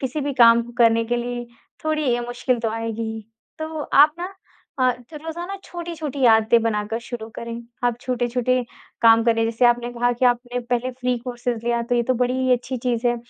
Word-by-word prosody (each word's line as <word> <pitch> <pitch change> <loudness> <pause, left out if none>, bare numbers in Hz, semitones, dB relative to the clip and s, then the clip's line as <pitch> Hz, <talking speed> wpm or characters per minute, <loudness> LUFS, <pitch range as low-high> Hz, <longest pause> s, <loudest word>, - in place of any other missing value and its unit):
किसी 265 +3 -2
भी 285 0 -2
काम 235 -2 +6
को 240 +1 -11
करने 230 -1 +4
के 240 +1 -1
लिए 240 0 -4 0.4
थोड़ी 305 -5 +1
अ, 240 - -3
मुश्किल 245 0 -1
तो 225 -2 -1
आएगी 225 0 -3
ही। 220 - -6 0.4
तो 315 -1 -5
आप 295 +2 +5
ना 355 - -3 0.5
अ, 255 - +5 0.2
तो 305 - -9
रोज़ाना 345 +4 -5
छोटी-छोटी 320 -6 -4
आदतें 225 +1 +4
बनाकर 215 0 -1
शुरू 235 -2 -7
करें। 235 0 -5 0.3
आप 240 -1 +1
छोटे-छोटे 250 0 0 0.4
काम 225 0 +7
करें, 230 -1 +3
जैसे 230 +2 0
आपने 240 0 +2
कहा 245 0 +1
कि 255 - +2
आपने 245 0 0
पहले 245 +1 -1
फ्री 250 -1 -1
कोर्सेज़ 240 -1 -4
लिया 235 0 +1
तो 245 +1 -1
ये 240 - +2
तो 255 +2 0
बड़ी 250 +1 0
ही 260 0 +2
अच्छी 250 +1 -1
चीज 245 -1 0
है 240 0 +2
245 Hz, 205 wpm, -22 LUFS, 230-255 Hz, 0.5 s, काम